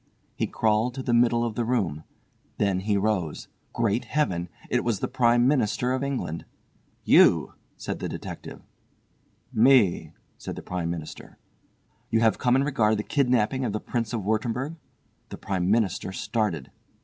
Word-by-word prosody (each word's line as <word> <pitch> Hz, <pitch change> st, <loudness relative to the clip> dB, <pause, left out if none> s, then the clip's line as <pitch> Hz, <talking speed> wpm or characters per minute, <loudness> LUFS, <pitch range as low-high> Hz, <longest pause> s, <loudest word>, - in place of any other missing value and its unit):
He -, -, -1 dB
crawled 110 Hz, +3 st, +1 dB
to 135 Hz, -, -5 dB
the 120 Hz, -, 0 dB
middle 120 Hz, 0 st, +3 dB
of 115 Hz, -, -3 dB
the 120 Hz, -, -1 dB
room. 95 Hz, -11 st, -1 dB, 0.5 s
Then 100 Hz, -3 st, +1 dB
he 100 Hz, +1 st, 0 dB
rose. 100 Hz, -6 st, -1 dB, 0.2 s
Great 115 Hz, 0 st, 0 dB
Heaven! 90 Hz, -, -1 dB, 0.2 s
It -, -, 0 dB
was 115 Hz, -5 st, 0 dB
the -, -, -1 dB
Prime 120 Hz, -1 st, +3 dB
Minister 125 Hz, -2 st, +1 dB
of 130 Hz, +1 st, -1 dB
England. 130 Hz, -, -3 dB, 0.6 s
"You!" -, -, +5 dB, 0.2 s
said -, -, -5 dB
the -, -, -4 dB
detective. -, -, -8 dB, 0.9 s
"Me," 115 Hz, -5 st, +4 dB, 0.3 s
said -, -, -6 dB
the -, -, -8 dB
Prime 90 Hz, -2 st, -3 dB
Minister. 85 Hz, -2 st, -7 dB, 0.7 s
"You 115 Hz, -, +2 dB
have 115 Hz, -1 st, +3 dB
come 125 Hz, -1 st, +3 dB
in 135 Hz, -, +3 dB
regard 110 Hz, -7 st, +2 dB
the 105 Hz, -, -2 dB
kidnapping 130 Hz, -1 st, +1 dB
of 115 Hz, -5 st, -1 dB
the 110 Hz, -, -1 dB
Prince 115 Hz, -1 st, -3 dB
of 115 Hz, -4 st, -3 dB
Wurttemberg?" 115 Hz, -, -1 dB, 0.5 s
The -, -, -7 dB
Prime 95 Hz, -2 st, -2 dB
Minister 100 Hz, -4 st, +1 dB
started. 95 Hz, -, -2 dB
115 Hz, 160 wpm, -26 LUFS, 100-125 Hz, 0.9 s, You